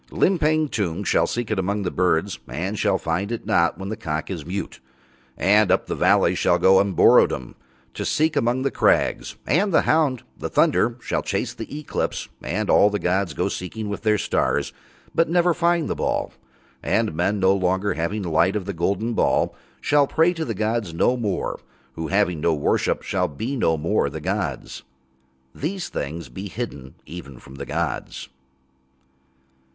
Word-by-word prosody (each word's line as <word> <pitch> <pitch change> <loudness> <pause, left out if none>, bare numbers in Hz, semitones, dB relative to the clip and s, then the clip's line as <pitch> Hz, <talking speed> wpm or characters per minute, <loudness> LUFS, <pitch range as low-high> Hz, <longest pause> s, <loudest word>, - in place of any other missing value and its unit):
Limpang 155 -4 +2
Tung 100 -3 -2
shall - - +2
seek 120 -2 -3
among 100 0 -1
the 90 - -2
birds 90 +1 0
and 95 - -3
shall - - +2
not - - -3
find 90 +6 -2
it 120 - -4 0.3
when 95 0 -6
the 110 - -3
cock 80 -5 -4
is 85 -5 -4
mute, 100 +3 -5 0.6
and 105 +2 +4
up - - +2
the - - -3
valleys - - +3
shall - - +3
go 95 0 +5
Umborodom 90 -9 +3 0.4
to - - -4
seek 155 +1 +1
among 120 +3 +1
the 135 - 0
crags. - - +1
And 195 +8 +2
the 160 - +4
hound, 150 -6 +2
the - - -5
thunder, 120 +2 +2
shall - - -1
chase - - -2
the 145 - -7
Eclipse 150 - -3
and 105 +5 -2
all 105 - +5
the 105 - -1
gods 90 -4 0
go - - 0
seeking 105 +4 -5
with 100 - -4
Their 110 -1 +2
stars, - - 0 0.4
but 165 - +2
never 175 0 +3
find 170 -1 +1
the - - -1
ball. - - -2 0.5
And 110 -6 0
men, 95 +6 0
no 95 0 +4
longer 95 +1 0
having 95 +6 -2
light 85 +3 +2
of 100 -3 -2
the 100 - -4
golden 100 +7 -1
ball, - - +1 0.3
shall 145 -1 +3
pray 165 +4 +3
to 165 -2 -3
the 115 - -3
gods 110 -4 -1
no 125 +8 +3
more, 105 -7 -2 0.3
who, 80 +3 -4
having 90 -4 +1
no 85 0 +2
worship, 70 - 0
shall - - 0
be 110 - -4
no 80 -10 +1
more 80 0 +1
the 80 +3 -6
gods. 85 -5 -3 0.7
These 175 +4 -4
things 75 +2 -5
be 95 +12 -7
hidden 75 - -6
even 70 -5 -9
from 65 - -14
the 70 - -7
gods. - - -3
100 Hz, 175 wpm, -23 LUFS, 85-120 Hz, 0.7 s, go